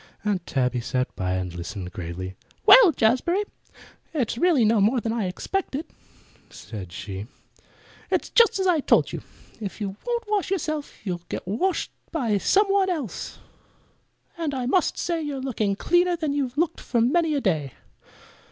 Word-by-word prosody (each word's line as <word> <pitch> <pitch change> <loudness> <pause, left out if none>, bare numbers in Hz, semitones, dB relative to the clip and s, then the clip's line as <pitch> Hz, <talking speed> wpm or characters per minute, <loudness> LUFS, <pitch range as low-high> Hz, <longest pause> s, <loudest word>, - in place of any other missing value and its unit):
Aunt 195 -4 -1
Tabby 125 -2 0
sat 125 +2 -2
by 90 -1 -1
and 90 -1 -2
listened 90 +2 -6
gravely. 90 +2 -6 0.3
"Well, 475 -9 +9
Jazbury, 280 - +2 0.7
it's 250 -8 0
really 285 -3 +3
no 215 -1 +4
more 230 +6 +3
than 225 0 -2
I 220 -5 -1
expected," 305 - -3 0.6
said 95 -6 -9
she. 100 +3 -6 0.8
"It's - - 0
just 465 -2 +5
as 380 - 0
I 355 -4 +4
told - - +3
you. - - -4 0.4
If 205 -2 -6
you 195 -2 -3
won't 475 -1 -1
wash 420 -3 0
yourself 310 - -3
you'll 175 -3 -3
get - - -5
washed 330 - 0 0.2
by 235 -11 0
some 405 - +4
one 390 -1 +3
else. 295 - -4 1.0
And 305 -4 -1
I 255 -2 -2
must 345 +8 +2
say 335 -2 -1
you're 290 -3 -3
looking 225 -6 -1
cleaner 350 - +2
than 310 -4 -2
you've 270 -2 -2
looked 335 +1 0
for 235 - 0
many 310 +6 +2
a 280 - 0
day." 155 - 0
245 Hz, 160 wpm, -25 LUFS, -, 1.0 s, Well